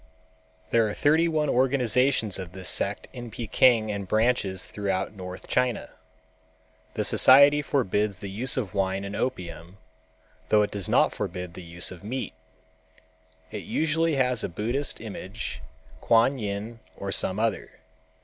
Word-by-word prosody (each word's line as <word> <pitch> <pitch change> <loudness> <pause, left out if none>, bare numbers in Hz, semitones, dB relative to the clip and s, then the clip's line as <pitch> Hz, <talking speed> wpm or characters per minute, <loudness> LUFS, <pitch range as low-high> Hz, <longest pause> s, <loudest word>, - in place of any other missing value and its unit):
There 115 -1 +4
are - - -5
thirty 160 +3 +3
one 155 -2 0
organizations 125 -4 +2
of 90 -2 -7
this 95 -1 -6
sect - - -1
in 120 -1 -7
Peking 115 0 +3
and 100 -2 -4
branches 110 -3 +1
throughout 100 -1 -2
North 90 -2 -8
China. 125 -3 0 1.0
The - - -1
society 140 +3 +6
forbids 105 -8 0
the 100 - -7
use 125 +7 -1
of 105 -8 -2
wine 95 0 -1
and 100 +1 -5
opium, 90 -6 -4 0.7
though 105 -1 +5
it 105 - -3
does 100 -4 -4
not - - +3
forbid 90 -1 -5
the 90 - -9
use 85 0 -3
of 90 0 -11
meat. 125 +5 -4 1.2
It 105 - -4
usually 160 0 +1
has 125 -3 +1
a - - -2
Buddhist 120 - -2
image, 110 -1 -6 0.4
Kuan 120 +4 +3
Yin 105 +2 -4 0.2
or 100 0 -4
some 95 +1 0
other. 115 0 -1
110 Hz, 145 wpm, -26 LUFS, 95-130 Hz, 1.2 s, society